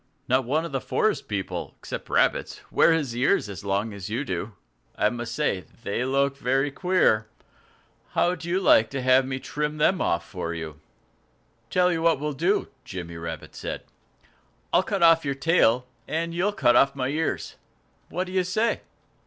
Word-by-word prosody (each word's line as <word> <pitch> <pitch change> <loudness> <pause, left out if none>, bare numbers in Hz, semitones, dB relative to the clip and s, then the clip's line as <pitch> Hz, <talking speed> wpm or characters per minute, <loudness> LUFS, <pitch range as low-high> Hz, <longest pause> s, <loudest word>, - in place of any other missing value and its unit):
"Not 130 0 +2
one 155 +6 0
of 170 - -6
the 135 -2 -2
forest 215 -1 0
people 100 -3 -4
except - - -7
rabbits - - +1
wears 165 - +5 0.2
his - - -7
ears 125 -3 +2
so 100 - -9
long 100 +3 0
as 100 0 -7
you 120 +7 -2
do. 95 +1 -4 0.4
I 105 - +2
must 120 -1 -5
say 150 -10 0
that 115 - -20
they 100 +4 -1
look 140 +1 +1
very 135 +2 +1
queer. 145 - +2 0.9
How'd 175 -1 +1
you 175 +3 0
like 115 - +5
to 135 -1 -3
have 130 +1 +4
me 130 -1 -2
trim 150 +3 -3
them 175 +5 +2 0.2
for 85 -1 -5
you?" 80 -2 -7 0.9
"Tell 180 0 +3
you 165 -2 -1
what 165 -3 +3
we'll 150 0 -2
do," 175 +9 +1
Jimmy 90 -7 -7
Rabbit 80 0 -7
said. - - -5 0.9
"I'll 175 - +6
cut 195 -2 -1
off 165 -1 +6
your 140 -1 -1
tail 135 -5 +3 0.2
and 165 +1 -2
you'll 185 +5 +1
cut 120 -11 +3
off 140 0 +4
my 130 -1 -1
ears. 155 +3 -2 0.6
What 180 - -1
do 185 - -9
you 185 -1 +2
say?" 215 +6 0
135 Hz, 175 wpm, -25 LUFS, 110-165 Hz, 0.9 s, I'll